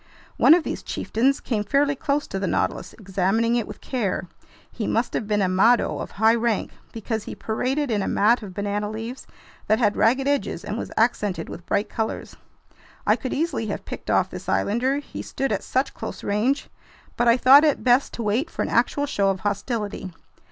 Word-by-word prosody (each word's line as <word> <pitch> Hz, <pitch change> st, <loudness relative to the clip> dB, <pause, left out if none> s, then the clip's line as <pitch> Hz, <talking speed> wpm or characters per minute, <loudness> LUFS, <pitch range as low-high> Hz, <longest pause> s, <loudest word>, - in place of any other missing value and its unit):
One 320 Hz, -, +7 dB
of 350 Hz, -, 0 dB
these -, -, -4 dB
chieftains 260 Hz, +5 st, 0 dB
came 215 Hz, -4 st, -2 dB
fairly 280 Hz, +6 st, +2 dB
close 285 Hz, +1 st, -1 dB
to 195 Hz, -, -4 dB
the 195 Hz, -, -1 dB
Nautilus, -, -, -1 dB
examining 200 Hz, +3 st, 0 dB
it 235 Hz, -3 st, -1 dB
with -, -, -10 dB
care. 220 Hz, -9 st, -2 dB, 0.5 s
He 220 Hz, -, -4 dB
must 230 Hz, +2 st, 0 dB
have 215 Hz, -, -2 dB
been 210 Hz, -1 st, +1 dB
a -, -, +2 dB
"mado" 210 Hz, +7 st, +3 dB
of -, -, -5 dB
high 220 Hz, +2 st, +4 dB
rank, 230 Hz, -2 st, 0 dB, 0.2 s
because 225 Hz, -1 st, -4 dB
he -, -, -6 dB
paraded 260 Hz, +5 st, -1 dB
in 210 Hz, -2 st, +1 dB
a -, -, -2 dB
mat 225 Hz, +4 st, +3 dB
of 195 Hz, -4 st, -9 dB
banana 205 Hz, +1 st, -2 dB
leaves 225 Hz, +4 st, -6 dB, 0.4 s
that 215 Hz, -, +3 dB
had 210 Hz, -3 st, +2 dB
ragged 260 Hz, +4 st, +2 dB
edges 285 Hz, 0 st, -1 dB
and -, -, -3 dB
was -, -, -5 dB
accented 205 Hz, -7 st, 0 dB
with 170 Hz, -, -9 dB
bright 200 Hz, +1 st, 0 dB
colors. 220 Hz, -1 st, -4 dB, 0.7 s
I -, -, +4 dB
could 260 Hz, -, -5 dB
easily 310 Hz, -7 st, -1 dB
have 205 Hz, -, -4 dB
picked -, -, -8 dB
off -, -, +2 dB
this -, -, -7 dB
islander, 255 Hz, +6 st, +1 dB
he 290 Hz, -, -7 dB
stood 270 Hz, 0 st, -3 dB
at -, -, 0 dB
such 265 Hz, +2 st, -1 dB
close -, -, -7 dB
range; 230 Hz, +8 st, 0 dB, 0.5 s
but 240 Hz, -, +1 dB
I 235 Hz, +1 st, +6 dB
thought 270 Hz, +4 st, +7 dB
it 300 Hz, -3 st, +2 dB
best 250 Hz, +2 st, +3 dB
to 235 Hz, -, -4 dB
wait 230 Hz, +10 st, 0 dB
for -, -, -3 dB
an -, -, -3 dB
actual 245 Hz, +5 st, +1 dB
show 200 Hz, -8 st, +1 dB
of 190 Hz, -1 st, -2 dB
hostility. 205 Hz, -1 st, -3 dB
225 Hz, 200 wpm, -24 LUFS, 205-260 Hz, 0.7 s, One